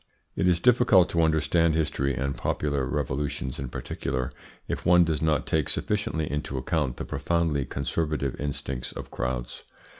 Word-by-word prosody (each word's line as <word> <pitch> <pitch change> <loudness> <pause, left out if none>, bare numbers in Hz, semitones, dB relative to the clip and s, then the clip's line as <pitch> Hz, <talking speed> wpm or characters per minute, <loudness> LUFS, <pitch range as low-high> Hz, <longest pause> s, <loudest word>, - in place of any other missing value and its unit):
It 95 - +1
is 90 -2 +4
difficult 115 -5 +5
to 85 - +2
understand 80 +1 +3
history, 70 -4 0
and 70 +1 -1
popular 70 -3 -1
revolutions 65 0 -2
in 65 -2 -4
particular, 65 +1 -3 0.4
if - - -3
one 90 0 +6
does 80 -2 -1
not 80 -3 +2
take 80 -4 0
sufficiently 100 -7 -1
into 75 -2 -3
account 65 -1 -1
the - - -4
profoundly 80 -5 0
conservative 70 0 -2
instincts 65 -3 -3
of - - -8
crowds. - - -3
75 Hz, 150 wpm, -27 LUFS, 65-85 Hz, 0.4 s, one